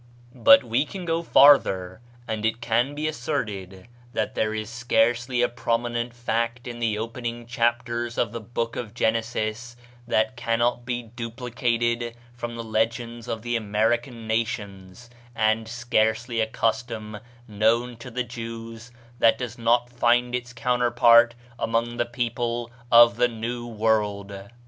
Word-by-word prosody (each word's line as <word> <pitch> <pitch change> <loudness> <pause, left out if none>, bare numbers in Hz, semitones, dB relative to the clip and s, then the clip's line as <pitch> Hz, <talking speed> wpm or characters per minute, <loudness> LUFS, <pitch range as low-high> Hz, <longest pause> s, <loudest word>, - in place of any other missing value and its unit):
But 135 +7 +7
we 120 +3 +1
can 180 +4 -7
go 165 0 0
farther, 110 - +5 0.3
and 110 -2 -3
it 110 +1 0
can 120 +4 0
be 155 +1 -2
asserted 110 -10 -4 0.3
that - - -1
there 110 - 0
is 110 -1 -4
scarcely 120 +1 +1
a - - +4
prominent 120 0 -2
fact 115 0 -2
in 120 -1 -6
the 110 -3 0
opening 120 +1 -5
chapters 120 -1 -1
of 115 - 0
the 115 - -5
Book 115 +1 -3
of 115 -2 -6
Genesis 115 +1 -1 0.3
that 110 +1 +1
cannot 120 +1 0
be 120 -1 -2
duplicated 120 0 -2 0.2
from 120 0 -6
the 115 - -5
legends 115 +1 -2
of 115 -2 -4
the 120 0 -1
American 115 +2 0
nations, 110 -2 -3 0.3
and 110 0 +1
scarcely 115 0 0
a 110 - +2
custom 110 -1 -2 0.3
known 115 +3 +1
to 120 +2 -9
the 125 +1 -2
Jews 115 0 -8 0.3
that 115 - +5
does 120 -1 -6
not 120 +1 +3
find 120 0 +2
its 125 0 -3
counterpart 120 -1 +4 0.2
among 115 +1 -1
the 120 - 0
people 120 -1 -2 0.2
of 120 0 +7
the 125 0 +4
New 120 +1 -5
World. 105 -3 -1
115 Hz, 140 wpm, -25 LUFS, 110-120 Hz, 0.3 s, But